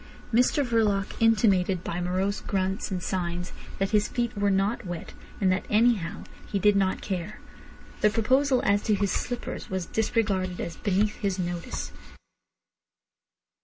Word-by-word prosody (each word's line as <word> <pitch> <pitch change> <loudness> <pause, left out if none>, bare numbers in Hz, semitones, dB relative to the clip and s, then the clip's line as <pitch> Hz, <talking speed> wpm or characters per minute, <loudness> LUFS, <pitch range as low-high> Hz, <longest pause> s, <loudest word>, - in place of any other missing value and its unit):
Mr 250 +4 +3
Verloc 215 -5 +1
intimated 195 -5 +3
by 175 +1 -3
morose 185 +3 -1
grunts 190 0 -1
and 185 -3 -3
signs 175 -1 -3 0.2
that 195 0 -1
his 210 -1 +3
feet 240 -2 -2
were 205 0 +1
not 200 +5 +1
wet, 175 -3 -6 0.3
and 190 -2 +3
that 185 - 0
anyhow 210 -6 +2 0.3
he 200 - +1
did 205 +1 +4
not 195 -1 +1
care. 190 +1 -4 0.6
The 210 - +5
proposal 255 +5 +2
as 200 0 +3
to 215 - +3
slippers 240 +5 -3
was 190 -2 -2
disregarded 195 -3 0
as 165 - -4
beneath 205 +2 0
his 195 -2 -1
notice. 175 -2 -4
200 Hz, 140 wpm, -27 LUFS, 185-215 Hz, 0.6 s, The